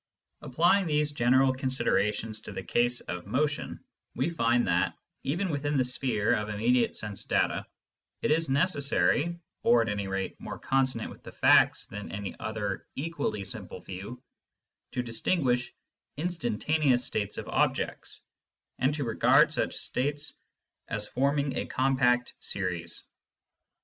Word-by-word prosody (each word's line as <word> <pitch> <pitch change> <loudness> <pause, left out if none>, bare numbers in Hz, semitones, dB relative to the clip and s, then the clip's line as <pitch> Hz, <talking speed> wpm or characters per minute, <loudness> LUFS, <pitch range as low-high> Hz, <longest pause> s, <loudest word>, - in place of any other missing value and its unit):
Applying 175 +8 +3
these 150 -1 +1
general 130 0 +3
considerations 115 -4 0
to - - -8
the - - -5
case 120 +1 +1
of 90 +1 -6
motion, 145 +7 -1 0.3
we 140 +6 0
find 120 -5 +2
that, 85 0 +1 0.3
even 175 +6 -1
within 145 0 -1
the 130 - +3
sphere 125 -4 +1
of 105 0 -1
immediate 115 +4 +1
sense 105 -2 -4
data, - - 0 0.6
it - - +2
is 160 0 +2
necessary, 145 - +2 0.2
or 120 -1 +5
at 110 - -3
any 100 -1 -2
rate 95 0 -3
more - - -6
consonant 130 -4 0
with - - -13
the - - -10
facts - - +4
than 100 0 -8
any 100 0 -5
other 105 -3 -3
equally 145 -8 -2
simple - - -6
view, 100 +7 -8 0.7
to 125 - -1
distinguish 125 +1 0 0.5
instantaneous 145 -4 +1
states 100 -2 -2
of - - -5
objects, - - -1 0.6
and 135 +4 +2
to 145 - -2
regard 115 -3 +4
such - - -1
states 145 +4 -1 0.5
as 105 -1 -3
forming 140 +1 0
a - - -2
compact 130 -2 +2
series. 90 -3 -3
125 Hz, 135 wpm, -29 LUFS, 105-145 Hz, 0.7 s, or